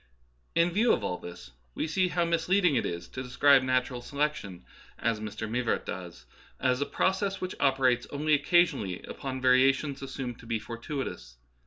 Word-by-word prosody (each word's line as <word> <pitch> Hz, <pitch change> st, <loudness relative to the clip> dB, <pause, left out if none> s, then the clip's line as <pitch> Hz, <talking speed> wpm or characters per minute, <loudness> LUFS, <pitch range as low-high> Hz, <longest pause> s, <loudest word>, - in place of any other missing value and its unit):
In 170 Hz, +1 st, +3 dB
view 220 Hz, +6 st, +3 dB
of -, -, -1 dB
all 90 Hz, -2 st, -2 dB
this 70 Hz, -8 st, -10 dB, 0.2 s
we -, -, -1 dB
see 185 Hz, +3 st, +1 dB
how 175 Hz, -1 st, 0 dB
misleading 170 Hz, 0 st, +2 dB
it -, -, +1 dB
is 85 Hz, 0 st, -5 dB
to 130 Hz, -, -6 dB
describe 135 Hz, +2 st, +4 dB
natural 130 Hz, -1 st, 0 dB
selection 140 Hz, -11 st, -3 dB, 0.3 s
(as 115 Hz, -1 st, 0 dB
Mr. 110 Hz, +1 st, -5 dB
Mivart 120 Hz, +1 st, -1 dB
does) 85 Hz, -9 st, -7 dB, 0.3 s
as 130 Hz, 0 st, +1 dB
a 145 Hz, -, 0 dB
process 195 Hz, +1 st, 0 dB
which 185 Hz, -, -4 dB
operates 130 Hz, -3 st, +2 dB
only 150 Hz, +2 st, 0 dB
occasionally 145 Hz, -, +2 dB
upon 130 Hz, -1 st, -5 dB
variations 135 Hz, +2 st, +3 dB
assumed 130 Hz, -3 st, -5 dB
to 115 Hz, -, -13 dB
be 115 Hz, -1 st, 0 dB
fortuitous. 115 Hz, -, -6 dB
130 Hz, 165 wpm, -29 LUFS, 115-150 Hz, 0.3 s, describe